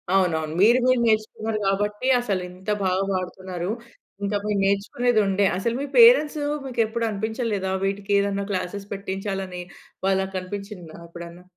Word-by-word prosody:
అవునవును. 160 -4 +1
మీరు 235 +5 +6
గూడ 255 0 +4
నేర్చుకున్నారు 215 0 0
గాబట్టి 205 +5 0
అసలింత 185 -3 -4 0.2
బాగా 185 +1 +1
బాడుతున్నారు. 185 0 -4 0.5
ఇంకా 205 +1 0
మీరు 210 -1 0
నేర్చుకునేదుండే. 200 0 +2
అసలు 230 +5 -1
మీ - - -2
పేరెంట్స్ 460 -11 +7 0.3
మీకెప్పుడు 230 -2 -1
అనిపించలేదా? 215 -2 -2
వీటికేదన్నా 200 0 0
క్లాసెస్ 195 +2 -3
పెట్టించాలని. 195 -2 -4 0.4
వాళ్ళకనిపించిందా 190 -2 -3
ఎప్పుడన్నా? 170 +1 -10
200 Hz, 110 wpm, -24 LUFS, 185-215 Hz, 0.5 s, పేరెంట్స్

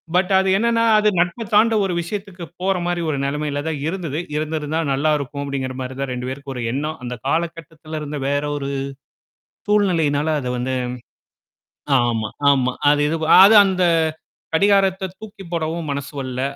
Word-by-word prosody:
But 180 +1 +2
அது 190 - +1
என்னான்னா, 230 +1 +2 0.2
அது 215 - +2
நட்ப 175 +7 0
தாண்ட 225 +2 +5
ஒரு 185 - -2
விஷயத்துக்கு 190 0 -6 0.2
போற 190 0 +1
மாரி 175 -1 -1
ஒரு 145 - -1
நெலமையில 145 0 -2
தான் 155 -3 -2
இருந்தது. 165 -4 -3 0.2
"இருந்திருந்தா 155 0 -2
நல்லா 145 +3 +1
இருக்கும்!" 140 0 -5
அப்படிங்கிற 135 -2 -3
மாரி 130 0 -5
தான் 135 -1 -2
2 125 0 -4
பேருக்கும் 135 +1 -6
ஒரு 125 - -4
எண்ணம். 150 +4 -3
அந்த 125 0 -4
காலகட்டத்துல 160 0 -3
இருந்த 150 0 -5
வேற 145 +1 0
ஒரு 140 -1 -4 1.0
சூழ்நிலையினால 160 -7 +2
அத 125 - -4
வந்து 130 +2 -2 1.3
ஆமா 115 -3 0 0.2
ஆமா. 130 -2 +3 0.2
அது 145 0 +3
இது 160 +2 0
வ - - 0 0.2
அது 215 +3 +7
அந்த 185 -1 0 0.7
கடிகாரத்த 195 +1 +3
தூக்கி 210 -2 -11
போடவும் 165 0 -2
மனசு 140 0 -4
வரல. 130 -1 -4
155 Hz, 160 wpm, -21 LUFS, 140-185 Hz, 1.3 s, அது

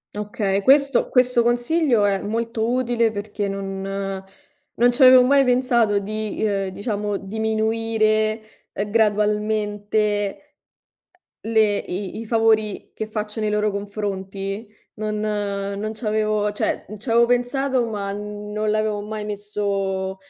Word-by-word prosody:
Okay, 205 -1 -1
questo 275 +2 +4
questo 250 -2 +3
consiglio 240 0 +2
è 200 -1 +1
molto 225 +1 -2
utile 240 -2 +1
perché 205 0 -4
non 195 -1 -4 1.0
non 245 +1 +5
ci 240 - -2
avevo 255 0 +9
mai 275 +2 +5
pensato 245 -4 +2
di, 215 +1 -4
uhm, 195 -2 0
diciamo 205 +1 -3
diminuire, 220 +1 0 0.3
uhm, 205 +1 -3
gradualmente 210 -1 0 1.0
le 220 -2 +2
i 190 +3 -5
i 230 - -7
favori 220 -2 +1
che 220 - -4
faccio 215 0 -4
nei 215 -1 0
loro 210 0 +1
confronti. 200 0 -4 0.3
Non 215 0 -3
non 205 -1 -2
c'avevo 215 -1 0
cioè 205 - -2
c'avevo 235 +2 +3
pensato 245 +1 +1
ma 205 -3 -3
non 210 +1 -4
l'avevo 215 -1 0
mai 210 0 -5
messo, 200 -2 -2
215 Hz, 120 wpm, -22 LUFS, 205-225 Hz, 1.0 s, avevo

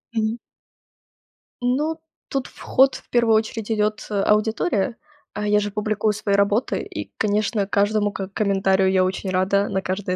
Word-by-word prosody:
Мгм. 220 +1 0 1.3
Ну, 300 +6 0 0.3
тут 270 -2 -2
в - - -18
ход 270 +1 +3
в - - -12
первую 235 -2 +3
очередь 220 0 -1
идёт, 210 0 0
э, 205 -2 -1
аудитория. 215 - +1 0.4
А, 210 0 -3
я 210 0 +4
же 205 -1 -3
публикую 215 0 0
свои 205 -1 0
работы 200 +4 +1
и, - - -7
конечно, 210 0 0
каждому 205 +1 +1
к 195 -1 -5
комментарию 195 -2 +2
я 185 -1 +3
очень 190 +1 -3
рада, 190 +2 +1
на 190 - -1
каждый 185 0 -2
210 Hz, 160 wpm, -22 LUFS, 200-220 Hz, 1.3 s, я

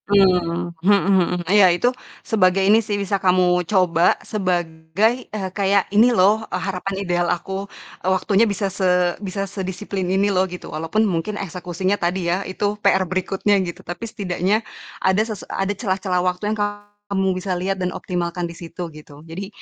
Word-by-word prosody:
Mmm, 180 -3 +2
mhm 200 +3 +5
mhm. 180 -2 +3
Iya, 195 +2 +6
itu 245 - +1 0.4
sebagai 190 -3 +3
ini 215 +3 +5
sih 210 -2 -2
bisa 200 -1 -1
kamu 180 -1 +3
coba 180 -4 +3
sebagai, 175 0 0 0.2
eee, 195 -3 -4
kayak 200 -1 +2
ini 225 +4 +6
loh, 215 -1 +4
eee, - - -2
harapan 195 +1 -3
ideal 175 -1 +1
aku. 195 +3 -3 0.3
Eee, 185 - -1
waktunya 205 +4 +2
bisa 200 0 -2
se 180 -2 +2
bisa 195 0 -3
sedisiplin 190 -1 -4
ini 195 +2 +2
loh 185 0 +2
gitu. 180 0 -8
Walaupun 165 +8 0
mungkin 195 +2 -2
eksekusinya 185 +1 -2
tadi 175 +1 -1
ya, 185 - -1
itu 185 +2 -2 0.2
PR 190 -2 +3
berikutnya 190 +3 0
gitu, 175 -2 -6
tapi 195 +7 -6
setidaknya 200 +2 -1 0.4
ada 190 +2 +4
sese 215 -3 -4
ada 195 +1 -2
celah-celah 190 -4 -1
waktu 180 +3 -1
yang 220 - -2 0.5
kamu 195 -1 +1
bisa 185 +1 -4
liat 195 +2 -1
dan 180 -1 -1
optimalkan 175 -1 -3
di - - -12
situ 175 +1 -7
gitu. 150 -1 -13
Jadi 185 +4 -6
190 Hz, 170 wpm, -21 LUFS, 180-200 Hz, 0.5 s, Iya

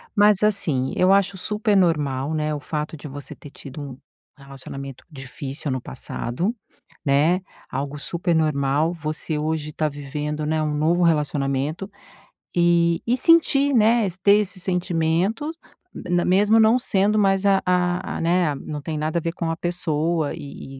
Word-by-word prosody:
Mas 205 -1 +4
assim, 160 -11 +2
eu 185 +1 +3
acho 195 0 +2
supernormal, 165 - +1
né, 155 -1 -1
o 150 - -3
fato 150 +1 -4
de 150 - -9
você 145 0 -8
ter 145 - -12
tido 140 0 -10
um 135 -3 -8 0.4
relacionamento 135 -1 -9
difícil 135 0 -5
no 130 - -2
passado, 120 - -4 0.5
né, 150 +6 +3 0.3
algo 140 +2 -4
supernormal. 155 -2 0
Você 155 -1 -3
hoje 155 0 -2
tá 155 0 0
vivendo, 150 +1 -4
né, 155 +1 0
um 150 -1 -1
novo 165 +4 +2
relacionamento 150 +2 0 0.7
e 170 -1 +3
e 240 +2 +2
sentir, 285 -1 +4
né, 225 0 +4 0.2
ter 200 +1 +6
esse 200 -3 -1
sentimento, 180 - 0 0.6
na 175 0 +2
mesmo 205 +4 +4
não 220 +3 +5
sendo 210 -3 +1
mais 195 -1 +2
a 195 -1 +3
a 180 0 0
a - - -4
né, 170 -2 +2
não 150 +1 -6
tem 155 +1 -4
nada 155 +2 -1
a - - -4
ver 165 - -2
com 165 -1 -3
a 165 - -2
pessoa 165 -2 -1
e 135 -1 -9
160 Hz, 155 wpm, -22 LUFS, 145-190 Hz, 0.7 s, ter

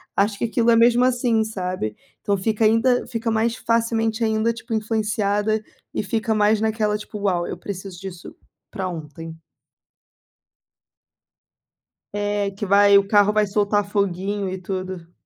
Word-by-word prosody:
Acho 200 0 +1
que - - -1
aquilo 230 +1 +1
é - - +5
mesmo, 240 +1 +5
assim, 245 -3 +2
sabe. 185 - -4 0.3
Então 200 -1 0
fica 215 +3 -1
ainda 230 +3 +3
fica 230 0 -3
mais 225 +1 +1
facilmente 230 0 0
ainda, 220 +1 +1
tipo 230 0 -7
influenciada 215 -1 0 0.3
e - - -1
fica 220 +2 -1
mais 210 +1 +3
naquela 215 -1 0
tipo: 210 0 -8
"Uau! 180 -4 0
Eu - - -5
preciso 185 -1 -7
disso 190 -2 -9 0.4
pra 190 -1 -3
ontem." 160 -1 -8 2.8
É 205 -1 -1
que 200 +2 -5
vai, 200 +1 +6
o 195 0 +2
carro 205 0 +4
vai 215 -1 +3
soltar 205 0 +1
foguinho 200 0 -1
e 190 - -4
tudo. 185 -2 -5
210 Hz, 145 wpm, -22 LUFS, 195-225 Hz, 2.8 s, vai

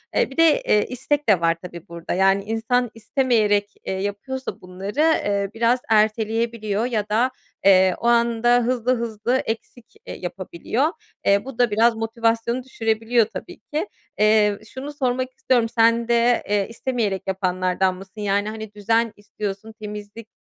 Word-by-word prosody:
Eee, - - +2
bir 270 - -12
de, 330 -2 +5
eee, 210 - +2
istek 270 +1 -1
de 185 -4 +4
var 165 0 +3
tabii 170 -2 -9
burada. 170 0 -5
Yani, 195 +1 +3
insan 225 +2 0
istemeyerek, 215 -3 +1
eee, - - -2
yapıyorsa 205 +7 -4
bunları, 190 +8 -6
eee, 205 -11 +2
biraz 235 +2 +2
erteleyebiliyor 220 0 +1
ya 215 -4 -2
da, 240 +5 +2 0.3
eee, 190 -1 +6
o 235 - -8
anda 235 0 +3
hızlı 250 +1 +1
hızlı 235 +2 -1
eksik, 225 +1 -6
eee, - - -6
yapabiliyor. 185 - -2 0.4
Eee, 200 +4 +3
bu 265 -3 -9
da 240 -3 +3
biraz 225 +2 +4
motivasyonu 230 +2 -1
düşürebiliyor 225 -1 +1
tabii 205 -3 -9
ki. 315 +7 -4 0.3
Eee, 210 -1 +4
şunu 280 +3 -7
sormak 255 -2 -1
istiyorum, 240 -3 +1
sen 230 0 +3
de, 235 0 +3
eee, 205 -1 +1
istemeyerek 230 -5 -2
yapanlardan 185 0 0
mısın? 195 +2 -11
Yani, 205 +1 0
hani, 220 -1 -7
düzen 225 +2 +1
istiyorsun, 205 +1 -6
temizlik 210 +1 -8
225 Hz, 150 wpm, -22 LUFS, 205-240 Hz, 0.4 s, eee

